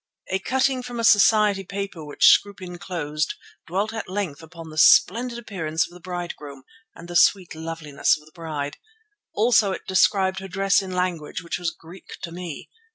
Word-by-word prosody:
A 190 - +1
cutting 260 +4 +1
from 245 -1 -7
a - - -1
society 210 -2 +5
paper 195 -3 -6
which 145 -1 +1
Scroope 200 -1 0
enclosed 170 -4 -4 0.3
dwelt 200 +6 -1
at 220 -4 -5
length 185 -7 -3
upon 165 0 -11
the 155 - -11
splendid 235 +9 +5
appearance 165 -9 -2
of 175 - -15
the 180 - -12
bridegroom 175 -6 -7 0.3
and 170 - -11
the 175 - -7
sweet 185 +1 +4
loveliness 160 -2 -1
of 150 - -19
the 155 - -19
bride. 155 -4 -5 0.6
Also 215 -3 +3
it - - -7
described 190 0 +2
her 190 - -7
dress 195 +2 +2
in 190 - -7
language 180 -3 -2
which 170 - -4
was 175 -1 -1
Greek 165 +3 -13
to 170 - -5
me. 170 -3 -7
180 Hz, 175 wpm, -23 LUFS, 165-200 Hz, 0.6 s, society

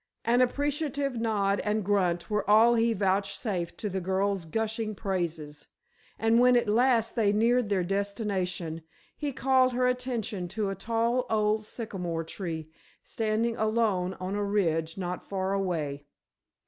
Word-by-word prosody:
An 240 +2 +4
appreciative 285 +1 0
nod 200 -3 +1
and 210 -1 -1
grunt 180 -4 +1
were 210 -1 -1
all 225 +3 +6
he 230 0 +3
vouchsafed 195 -2 -1
to 215 - -3
the 190 -1 -3
girl's 190 0 0
gushing 220 +3 -2
praises, 165 -7 -4 0.5
and 225 +2 +3
when 250 0 +6
at 240 -1 +1
last 230 +1 +3
they 215 -4 +3
neared 230 +2 +2
their 195 -3 +1
destination 190 -4 -2 0.3
he 290 -2 -3
called 260 -1 +3
her 250 +1 +2
attention 240 -7 -2
to 200 +2 -2
a - - -4
tall 230 +5 0
old 215 0 +1
sycamore 180 -9 -4
tree 160 -2 -5 0.3
standing 225 +1 -1
alone 215 -4 +1
on 185 +1 -4
a 205 0 -1
ridge 165 -5 0
not 180 -1 -5
far 190 0 -1
away. 160 -8 -2
210 Hz, 145 wpm, -28 LUFS, 185-230 Hz, 0.5 s, all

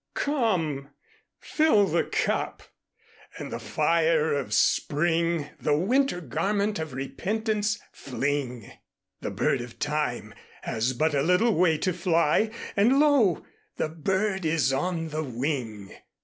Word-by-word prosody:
"Come, 180 - 0 0.5
fill 305 -10 +3
the 170 -2 +1
Cup, - - -2 0.7
and - - -6
in - - -12
the - - -4
Fire 165 -2 +1
of 135 -7 -2
Spring 165 +6 +1
The 150 -1 +1
Winter 240 - +1
Garment 200 - -1
of 160 -4 -5
Repentance 210 - -1
fling; 130 -3 -3 0.5
The - - -4
Bird 130 - 0
of 120 -1 -10
Time 145 -8 -2 0.3
has 120 +4 -1
but 155 +5 +1
a 140 - +2
little 180 +9 +3
way 165 -3 +3
To 185 +3 -1
fly 170 +3 +2 0.3
and 235 +7 +4
Lo! 280 - +3 0.3
the - - -1
Bird 190 +5 -1
is 155 -4 +1
on 165 +3 -1
the 155 +1 -3
Wing." 120 -6 -4
165 Hz, 130 wpm, -26 LUFS, 145-200 Hz, 0.7 s, and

